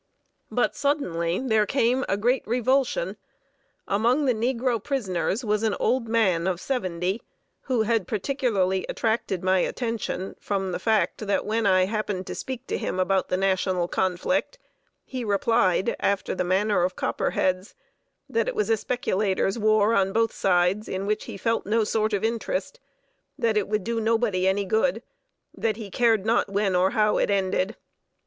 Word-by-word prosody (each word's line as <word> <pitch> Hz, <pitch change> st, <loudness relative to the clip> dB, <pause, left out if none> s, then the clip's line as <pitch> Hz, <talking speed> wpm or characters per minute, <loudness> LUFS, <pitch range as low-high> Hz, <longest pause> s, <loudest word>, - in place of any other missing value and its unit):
But -, -, 0 dB
suddenly 180 Hz, -, 0 dB
there 220 Hz, -5 st, +1 dB
came 255 Hz, 0 st, +1 dB
a 195 Hz, -, +1 dB
great 245 Hz, +5 st, +2 dB
revulsion. 245 Hz, -5 st, +1 dB, 0.7 s
Among 240 Hz, +8 st, +2 dB
the 255 Hz, -, +3 dB
negro 235 Hz, 0 st, -1 dB
prisoners 220 Hz, -3 st, -1 dB
was 210 Hz, 0 st, +1 dB
an 220 Hz, -2 st, +1 dB
old 255 Hz, -2 st, +1 dB
man 190 Hz, -7 st, +2 dB
of 180 Hz, -2 st, -1 dB
seventy, 185 Hz, -4 st, -2 dB, 0.4 s
who 250 Hz, -4 st, +1 dB
had 220 Hz, -4 st, 0 dB
particularly 205 Hz, -4 st, 0 dB
attracted 220 Hz, -5 st, -1 dB
my 185 Hz, 0 st, +3 dB
attention 225 Hz, -3 st, -3 dB
from 195 Hz, -2 st, -2 dB
the 175 Hz, -, -3 dB
fact 220 Hz, 0 st, 0 dB
that 200 Hz, -, 0 dB
when 220 Hz, 0 st, 0 dB
I 185 Hz, -1 st, +4 dB
happened 205 Hz, -2 st, -3 dB
to -, -, -5 dB
speak 260 Hz, -1 st, -6 dB
to -, -, -3 dB
him 185 Hz, -, -3 dB
about 190 Hz, 0 st, +1 dB
the 185 Hz, -, +1 dB
National 185 Hz, -2 st, +1 dB
conflict, 190 Hz, -, -1 dB, 0.5 s
he 255 Hz, -2 st, -5 dB
replied, 200 Hz, -2 st, +2 dB
after 200 Hz, 0 st, 0 dB
the 185 Hz, -, -1 dB
manner 190 Hz, +2 st, +1 dB
of 180 Hz, +1 st, 0 dB
Copperheads, 185 Hz, +2 st, -1 dB, 0.5 s
that 460 Hz, -, 0 dB
it -, -, -2 dB
was 425 Hz, -, 0 dB
a 225 Hz, -, +4 dB
speculators' 205 Hz, -3 st, -1 dB
war 215 Hz, 0 st, +3 dB
on 195 Hz, -2 st, +2 dB
both 225 Hz, 0 st, +1 dB
sides, 180 Hz, +3 st, +1 dB
in 190 Hz, +1 st, -3 dB
which 210 Hz, +1 st, -1 dB
he -, -, -7 dB
felt 230 Hz, +1 st, -1 dB
no 220 Hz, +2 st, +2 dB
sort 215 Hz, 0 st, 0 dB
of 200 Hz, -, 0 dB
interest; 235 Hz, -, -2 dB, 0.6 s
that 225 Hz, -2 st, +1 dB
it 210 Hz, -2 st, +1 dB
would 210 Hz, -1 st, -1 dB
do 230 Hz, +1 st, -2 dB
nobody 220 Hz, -4 st, +1 dB
any 200 Hz, +1 st, +1 dB
good; 225 Hz, +5 st, +1 dB, 0.5 s
that 220 Hz, -2 st, -1 dB
he 210 Hz, -4 st, -8 dB
cared 225 Hz, -2 st, +2 dB
not 225 Hz, -2 st, +2 dB
when 200 Hz, -1 st, 0 dB
or 180 Hz, +1 st, +3 dB
how 210 Hz, +1 st, +2 dB
it -, -, +1 dB
ended. 195 Hz, +1 st, 0 dB
210 Hz, 165 wpm, -25 LUFS, 190-230 Hz, 0.7 s, I